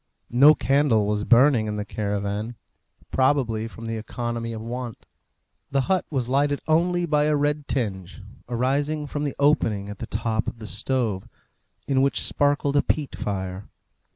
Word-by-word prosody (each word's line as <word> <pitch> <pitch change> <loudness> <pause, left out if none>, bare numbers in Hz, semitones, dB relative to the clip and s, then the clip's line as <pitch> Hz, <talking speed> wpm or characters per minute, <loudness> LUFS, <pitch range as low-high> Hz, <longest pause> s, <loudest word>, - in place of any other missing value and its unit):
No 140 +6 +7
candle 135 -6 +2
was 105 +1 -1
burning 125 -2 +5
in 105 - -2
the 105 -1 -3
caravan, 105 +2 -3 0.6
probably 130 -5 +1
from 115 0 -10
the 115 0 -3
economy 115 +1 -4
of 110 - -5
want. 120 +1 -6 0.6
The 135 0 +1
hut 185 +6 0
was 130 -5 -1
lighted 140 +2 +1
only 175 +2 +2
by 150 -2 +2
a 150 0 +2
red 145 0 0
tinge, 95 -7 -3 0.3
arising 140 +5 0
from 145 0 -3
the 140 - -3
opening 115 -9 +2
at 105 - -8
the - - -5
top 110 -1 -1
of - - -4
the 110 - -9
stove, 110 -3 -1 0.6
in 135 -1 +2
which 140 0 +2
sparkled 145 0 +1
a 145 - +5
peat 150 -3 -2
fire. 95 -1 -4
125 Hz, 160 wpm, -24 LUFS, 110-145 Hz, 0.6 s, No